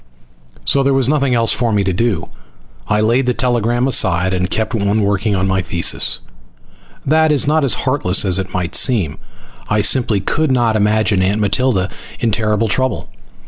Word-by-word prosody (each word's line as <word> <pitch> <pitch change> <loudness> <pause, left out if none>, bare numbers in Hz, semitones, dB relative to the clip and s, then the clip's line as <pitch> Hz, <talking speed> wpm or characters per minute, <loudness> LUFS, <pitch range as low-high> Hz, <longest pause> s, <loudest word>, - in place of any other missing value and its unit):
So 140 - +3
there 135 0 +1
was 135 -2 +1
nothing 140 -3 +1
else 115 -1 +2
for 120 -2 -1
me 105 -2 +1
to 95 -1 -1
do. 100 -4 -1 0.6
I 105 0 +1
laid 120 +4 +1
the 125 - 0
telegram 120 0 0
aside 90 -7 +1
and 90 0 -1
kept 110 +3 -2
on 105 0 0
working 100 +1 0
on 95 0 -1
my 95 0 0
thesis. 85 -1 0 0.8
That 155 +2 +2
is 150 -1 +2
not 155 +1 +1
as 135 - +1
heartless 110 -9 +1
as 95 -1 +2
it 95 -1 -5
might 90 -2 -3
seem. 100 - +1 0.5
I 105 0 +1
simply 105 0 +2
could 150 +9 -1
not 120 -3 +1
imagine 105 -1 +1
Aunt 95 +3 +1
Matilda 105 -1 0 0.3
in 115 - 0
terrible 105 +1 0
trouble. 130 +4 -2
110 Hz, 180 wpm, -16 LUFS, 95-130 Hz, 0.8 s, So